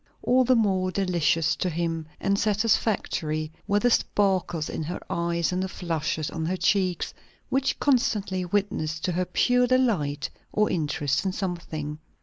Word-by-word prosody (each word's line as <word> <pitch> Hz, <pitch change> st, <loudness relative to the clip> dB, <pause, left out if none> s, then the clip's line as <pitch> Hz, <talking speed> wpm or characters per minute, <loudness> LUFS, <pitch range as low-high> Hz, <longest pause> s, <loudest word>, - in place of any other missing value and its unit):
All 255 Hz, +1 st, +4 dB
the 255 Hz, +1 st, +4 dB
more 190 Hz, -5 st, +2 dB
delicious 170 Hz, -4 st, +1 dB
to 185 Hz, -, 0 dB
him, 165 Hz, -1 st, -2 dB
and 200 Hz, 0 st, +1 dB
satisfactory, 200 Hz, -7 st, 0 dB, 0.2 s
were 205 Hz, -, +2 dB
the 245 Hz, +3 st, +3 dB
sparkles 185 Hz, -8 st, +1 dB
in -, -, -4 dB
her 165 Hz, +4 st, -4 dB
eyes 170 Hz, 0 st, 0 dB
and 180 Hz, +1 st, -1 dB
the 190 Hz, -, -2 dB
flushes 160 Hz, -4 st, -2 dB
on 160 Hz, -, -3 dB
her 185 Hz, +2 st, -1 dB
cheeks, 185 Hz, -2 st, +1 dB, 0.4 s
which 270 Hz, 0 st, +1 dB
constantly 210 Hz, -8 st, +1 dB
witnessed 175 Hz, -4 st, -1 dB
to 180 Hz, -, 0 dB
her 180 Hz, +1 st, 0 dB
pure 250 Hz, +6 st, +3 dB
delight 205 Hz, -, +1 dB, 0.2 s
or 210 Hz, 0 st, +2 dB
interest 145 Hz, -3 st, 0 dB
in 190 Hz, -1 st, -1 dB
something. 160 Hz, -6 st, -4 dB
185 Hz, 150 wpm, -26 LUFS, 160-205 Hz, 0.4 s, All